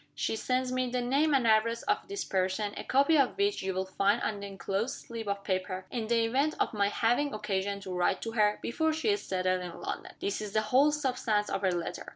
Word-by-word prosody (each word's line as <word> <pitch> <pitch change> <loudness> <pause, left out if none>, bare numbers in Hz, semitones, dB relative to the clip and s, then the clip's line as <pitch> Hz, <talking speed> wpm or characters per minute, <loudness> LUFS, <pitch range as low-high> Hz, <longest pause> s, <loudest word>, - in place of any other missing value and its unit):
She - - -1
sends 255 +2 -1
me 255 0 0
the 250 +1 -1
name 275 +6 +2
and 260 -3 +2
address 230 +1 +3
of 415 0 0
this 400 0 -4
person 190 +2 -1
a - - -5
copy 280 +4 +4
of 270 +6 +2
which 405 0 +1
you 190 - -1
will 190 0 -1
find 195 +1 +1
on 210 -2 -1
the 200 - -6
inclosed 200 +6 -2
slip 230 -2 -6
of 200 0 -2
paper 185 0 -2
in 230 -3 -3
the 230 0 +2
event 275 +7 +1
of - - 0
my 200 -2 +2
having 245 +6 +1
occasion 200 -1 -2
to 190 -2 -6
write 180 0 +1
to 225 - -3
her, 210 -2 +2
before 320 +6 0
she 320 +7 -1
is 410 -1 +1
settled 185 -1 0
in 175 -1 -7
London. - - -5
This 200 - -2
is 210 -1 -6
the 215 - +3
whole 280 +4 +6
substance 250 -8 0
of - - -1
her 190 -2 +2
letter. 175 -1 -4
225 Hz, 235 wpm, -30 LUFS, 195-260 Hz, -, whole